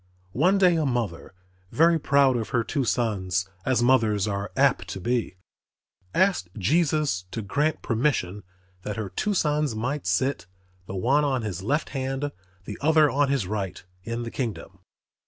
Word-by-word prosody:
One 180 Hz, +9 st, +3 dB
day 180 Hz, -3 st, +4 dB
a 155 Hz, -, +1 dB
mother, 115 Hz, -9 st, -3 dB, 0.4 s
very 165 Hz, +1 st, +4 dB
proud 140 Hz, -3 st, +3 dB
of 115 Hz, -2 st, -2 dB
her 115 Hz, -2 st, +1 dB
two 135 Hz, +3 st, -1 dB
sons, 95 Hz, -7 st, 0 dB, 0.2 s
as 130 Hz, -2 st, +2 dB
mothers 110 Hz, -5 st, +3 dB
are 100 Hz, 0 st, -3 dB
apt 135 Hz, -1 st, +3 dB
to 95 Hz, -, -5 dB
be, 120 Hz, -1 st, -1 dB, 0.8 s
asked 185 Hz, -, +2 dB
Jesus 145 Hz, -, +1 dB
to 115 Hz, +3 st, -5 dB
grant 145 Hz, +9 st, -1 dB
permission 110 Hz, -6 st, 0 dB, 0.4 s
that 105 Hz, +3 st, -5 dB
her 110 Hz, -3 st, -3 dB
two 205 Hz, -, -1 dB
sons 150 Hz, -6 st, +1 dB
might 125 Hz, +7 st, -3 dB
sit, 130 Hz, -10 st, 0 dB, 0.4 s
the 95 Hz, -, -6 dB
one 135 Hz, +10 st, +2 dB
on 130 Hz, -5 st, 0 dB
his 95 Hz, -4 st, -4 dB
left 145 Hz, +10 st, -1 dB
hand, 135 Hz, +1 st, -3 dB, 0.3 s
the -, -, -7 dB
other 155 Hz, -1 st, +4 dB
on 140 Hz, +2 st, +2 dB
his 135 Hz, -7 st, 0 dB
right, 95 Hz, -2 st, -4 dB, 0.2 s
in 115 Hz, +1 st, -4 dB
the 115 Hz, -, -6 dB
kingdom. 100 Hz, -6 st, -5 dB
125 Hz, 160 wpm, -25 LUFS, 105-145 Hz, 0.8 s, day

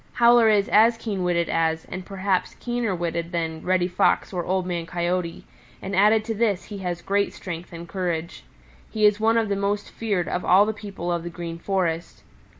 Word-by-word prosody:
Howler 235 Hz, -1 st, +6 dB
is 205 Hz, -2 st, +3 dB
as 225 Hz, +2 st, +5 dB
keen 205 Hz, -5 st, -3 dB
witted 170 Hz, -1 st, +1 dB
as, 160 Hz, 0 st, 0 dB
and 185 Hz, -, -6 dB
perhaps 190 Hz, -1 st, -1 dB
keener 240 Hz, -5 st, -1 dB
witted 170 Hz, 0 st, -3 dB
than, 165 Hz, -2 st, -2 dB
Reddy 180 Hz, -1 st, +1 dB
Fox 180 Hz, +2 st, +1 dB
or 175 Hz, -1 st, -2 dB
Old 185 Hz, 0 st, -1 dB
Man 170 Hz, -2 st, -3 dB
Coyote, 175 Hz, 0 st, -2 dB, 0.3 s
and 195 Hz, 0 st, -4 dB
added 215 Hz, +3 st, +4 dB
to 225 Hz, -, -2 dB
this 210 Hz, -4 st, 0 dB
he 205 Hz, -2 st, -8 dB
has 175 Hz, -2 st, -4 dB
great 200 Hz, +1 st, 0 dB
strength 175 Hz, -2 st, -7 dB
and 170 Hz, 0 st, -8 dB
courage. 170 Hz, -2 st, -3 dB, 0.5 s
He 215 Hz, -1 st, +1 dB
is 210 Hz, 0 st, +4 dB
one 225 Hz, +1 st, +3 dB
of 225 Hz, -1 st, +2 dB
the 200 Hz, -, 0 dB
most 200 Hz, +1 st, -2 dB
feared 200 Hz, -6 st, -1 dB
of 180 Hz, -, -2 dB
all 195 Hz, +3 st, +5 dB
the 220 Hz, -, -1 dB
people 200 Hz, -4 st, -5 dB
of 170 Hz, -1 st, -1 dB
the 175 Hz, -, -6 dB
Green 170 Hz, -1 st, -6 dB
Forest. 170 Hz, -3 st, -2 dB
185 Hz, 200 wpm, -24 LUFS, 170-210 Hz, 0.5 s, Howler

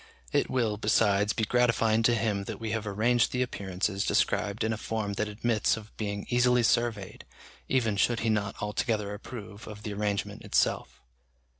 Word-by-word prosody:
It -, -, +1 dB
will, 115 Hz, -5 st, 0 dB
besides, 105 Hz, -1 st, +3 dB
be 115 Hz, -, -2 dB
gratifying 115 Hz, -1 st, +2 dB
to 120 Hz, +1 st, +4 dB
him 105 Hz, -3 st, -1 dB
that -, -, -6 dB
we 110 Hz, -1 st, -3 dB
have 115 Hz, -1 st, -2 dB
arranged 115 Hz, +4 st, +2 dB
the 125 Hz, 0 st, +1 dB
appearances 100 Hz, -3 st, -2 dB
described 100 Hz, +1 st, +1 dB
in 110 Hz, 0 st, +1 dB
a -, -, -3 dB
form 110 Hz, -2 st, -3 dB
that 105 Hz, +1 st, -1 dB
admits 110 Hz, +1 st, 0 dB
of 110 Hz, -1 st, -12 dB
being 100 Hz, -1 st, -4 dB
easily 125 Hz, 0 st, +4 dB
surveyed, 115 Hz, -4 st, 0 dB, 0.5 s
even 115 Hz, -6 st, +1 dB
should 115 Hz, +3 st, +2 dB
he 115 Hz, -, +1 dB
not 100 Hz, -2 st, -1 dB
altogether 105 Hz, 0 st, -1 dB
approve 105 Hz, -1 st, -9 dB
of 105 Hz, -1 st, -9 dB
the 105 Hz, -, -4 dB
arrangement 100 Hz, -1 st, -2 dB
itself. -, -, 0 dB
110 Hz, 170 wpm, -28 LUFS, 100-115 Hz, 0.5 s, to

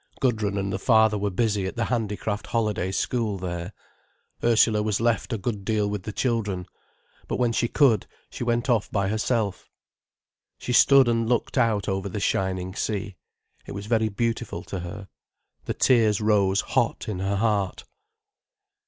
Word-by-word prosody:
Gudrun 110 Hz, -6 st, 0 dB
and 100 Hz, -1 st, -2 dB
the 95 Hz, -, -2 dB
father 110 Hz, -1 st, +4 dB
were 105 Hz, 0 st, -1 dB
busy 100 Hz, 0 st, 0 dB
at -, -, -6 dB
the 120 Hz, -, 0 dB
handicraft 105 Hz, -3 st, -2 dB
holiday 105 Hz, -5 st, -1 dB
school 110 Hz, +1 st, -1 dB
there, 90 Hz, 0 st, -5 dB, 0.7 s
Ursula 115 Hz, -2 st, +4 dB
was 105 Hz, -1 st, 0 dB
left 120 Hz, +1 st, 0 dB
a 115 Hz, -, 0 dB
good 100 Hz, 0 st, -3 dB
deal 105 Hz, 0 st, 0 dB
with 105 Hz, -1 st, -3 dB
the 110 Hz, -, -6 dB
children. 105 Hz, -6 st, -1 dB, 0.6 s
But -, -, -2 dB
when 120 Hz, -2 st, +2 dB
she 120 Hz, +1 st, +1 dB
could, 120 Hz, -7 st, +3 dB, 0.2 s
she -, -, -5 dB
went 120 Hz, +1 st, 0 dB
off 115 Hz, -5 st, +1 dB
by 100 Hz, -2 st, 0 dB
herself. 110 Hz, -2 st, -1 dB, 0.9 s
She 125 Hz, -, -4 dB
stood 135 Hz, 0 st, +6 dB
and 115 Hz, -1 st, +1 dB
looked 120 Hz, -2 st, 0 dB
out 115 Hz, -6 st, +1 dB
over 95 Hz, 0 st, -2 dB
the 105 Hz, -, -4 dB
shining 95 Hz, -2 st, -1 dB
sea. 100 Hz, -1 st, -3 dB, 0.5 s
It -, -, -6 dB
was 100 Hz, +1 st, -6 dB
very 110 Hz, 0 st, +1 dB
beautiful 115 Hz, +2 st, -2 dB
to 95 Hz, -, -5 dB
her. 90 Hz, +3 st, -7 dB, 0.6 s
The -, -, -3 dB
tears 110 Hz, -5 st, +3 dB
rose 100 Hz, -2 st, +2 dB
hot 125 Hz, -3 st, -1 dB
in 105 Hz, -4 st, -3 dB
her 95 Hz, +1 st, -1 dB
heart. 100 Hz, -3 st, 0 dB
105 Hz, 165 wpm, -25 LUFS, 100-115 Hz, 0.9 s, stood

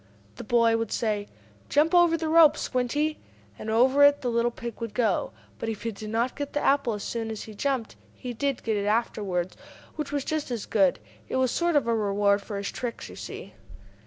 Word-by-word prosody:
The -, -, -6 dB
boy 230 Hz, 0 st, +3 dB
would 225 Hz, -2 st, -3 dB
say: 210 Hz, -3 st, -1 dB, 0.4 s
"Jump 305 Hz, +4 st, +3 dB
over 345 Hz, -2 st, +5 dB
the 320 Hz, 0 st, -3 dB
rope, 315 Hz, -1 st, +6 dB
Squinty!" 290 Hz, +5 st, -1 dB, 0.4 s
And 215 Hz, -, -5 dB
over 260 Hz, +6 st, +4 dB
it 285 Hz, 0 st, +6 dB
the 245 Hz, -, -1 dB
little 235 Hz, +1 st, +2 dB
pig 235 Hz, -1 st, -8 dB
would 230 Hz, -3 st, -5 dB
go. 220 Hz, -6 st, +1 dB, 0.3 s
But 225 Hz, -, -3 dB
if 220 Hz, -1 st, -5 dB
he 230 Hz, -, -1 dB
did 215 Hz, +1 st, -8 dB
not 230 Hz, +3 st, 0 dB
get 285 Hz, -1 st, -5 dB
the 295 Hz, -, +1 dB
apple 275 Hz, -5 st, +2 dB
as 210 Hz, -, -5 dB
soon 225 Hz, -1 st, -3 dB
as 220 Hz, -1 st, -5 dB
he 220 Hz, -, -10 dB
jumped, 255 Hz, +1 st, -2 dB, 0.2 s
he 250 Hz, -1 st, -6 dB
did 275 Hz, +2 st, -2 dB
get 220 Hz, -2 st, 0 dB
it 200 Hz, 0 st, -1 dB
afterward, 205 Hz, -5 st, -1 dB, 0.4 s
which 300 Hz, -2 st, -4 dB
was 285 Hz, -2 st, -2 dB
just 310 Hz, -3 st, -2 dB
as 235 Hz, -4 st, -3 dB
good. 195 Hz, -4 st, +3 dB, 0.3 s
It -, -, -2 dB
was 260 Hz, -2 st, +2 dB
sort 345 Hz, -1 st, +1 dB
of 290 Hz, -, +3 dB
a 235 Hz, -, +1 dB
reward 205 Hz, -1 st, +2 dB
for 205 Hz, 0 st, -6 dB
his 200 Hz, 0 st, -3 dB
tricks, 240 Hz, -2 st, -5 dB
you -, -, -10 dB
see. -, -, -8 dB
235 Hz, 220 wpm, -26 LUFS, 215-285 Hz, 0.4 s, rope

